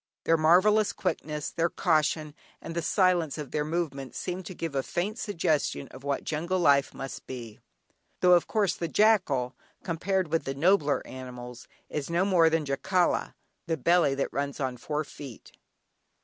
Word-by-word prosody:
Their 165 - +4
marvellous 185 +7 +4
quickness, 150 -5 -3
their 170 0 0
caution, 155 -3 +1 0.3
and 165 - -7
the 170 - -1
silence 175 -4 +2
of 150 -3 -6
their 150 - 0
movements 150 -4 -3
seemed 180 -1 -4
to 185 - -8
give 165 -3 -4
a 135 - +1
faint 205 - -3
suggestion 160 - -1
of 130 - -12
what 140 0 -1
jungle 170 +4 -1
life 140 -6 +4
must 135 - -8
be, 115 -4 -8 0.6
though, 180 - +5
of 175 - +4
course, 210 -4 +1
the 170 - -3
jackal 165 - +2 0.3
compared 185 +1 -1
with 165 - +1
the 135 - -3
nobler 155 -1 +2
animals, 125 -2 -9 0.2
is 150 -1 -4
no 170 +3 +2
more 175 -5 +5
than 160 -1 0
"Jacala, 175 +6 0 0.3
the 165 -1 0
belly 165 -1 +3
that 135 - -2
runs 140 0 -2
on 130 -2 -1
four 150 +5 -3
feet." 140 -5 -11
160 Hz, 165 wpm, -28 LUFS, 140-180 Hz, 0.6 s, though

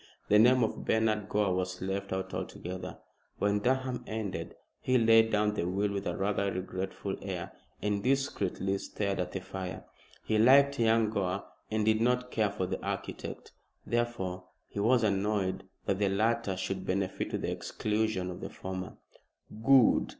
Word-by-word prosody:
The 105 - +6
name 125 +2 +6
of 110 - -2
Bernard 110 -2 +1
Gore 100 -3 +2
was 90 0 -2
left 95 +1 -3
out 95 0 -3
altogether. 90 0 -5 0.4
When 105 0 +2
Durham 130 +1 0
ended 100 -7 -4 0.2
he 130 0 +2
laid 115 -1 +5
down 105 0 +2
the 100 - -1
will 100 +3 0
with 100 0 -3
a - - -2
rather 100 0 0
regretful 95 +1 -4
air, - - -4 0.3
and 105 -1 0
discreetly 100 -7 0
stared 100 -1 -2
at 90 - -2
the 95 - -3
fire. 95 -1 -6 0.4
He 110 -1 +2
liked 140 +4 +6
young 115 -1 +3
Gore 100 -2 -1 0.3
and 110 -1 0
did 110 0 +3
not 125 +1 +1
care 110 -2 +2
for 100 -2 -2
the - - -4
architect. - - -5 0.3
Therefore 95 -7 -2 0.2
he - - -6
was 115 +3 +4
annoyed 100 -2 0 0.2
that 100 -1 0
the 100 -1 +2
latter 110 0 +1
should 95 0 -3
benefit 95 0 -1
to - - -2
the - - -2
exclusion 105 -4 -1
of 90 - -8
the - - -5
former. 95 -1 -6 0.7
"Good!" 130 -1 +5
105 Hz, 165 wpm, -30 LUFS, 95-115 Hz, 0.7 s, The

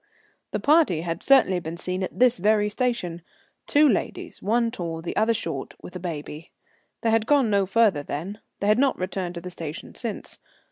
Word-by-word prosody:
The - - -2
party 295 - +3
had 165 -1 -4
certainly 255 -10 +4
been 165 0 -6
seen 185 +2 -3
at 185 - -4
this 250 -3 +4
very 210 +2 +3
station. 210 -7 -2 0.5
Two 295 +1 +5
ladies, 225 - -2
one 230 +3 +1
tall, 170 -7 -4
the 165 - -5
other 220 +2 +3
short, 165 -11 -4
with 180 - -10
a - - -4
baby. 160 -2 -6 0.5
They 225 - +1
had 225 0 +2
gone 275 -7 +3
no 200 -1 +2
further 205 -7 +3
then; 170 +9 -5 0.2
they 200 - 0
had 215 +3 +4
not 275 0 +2
returned 185 -1 -3
to 170 - -5
the 180 +1 -7
station 160 -3 -7
since. 230 -4 -6
195 Hz, 190 wpm, -25 LUFS, 170-230 Hz, 0.5 s, Two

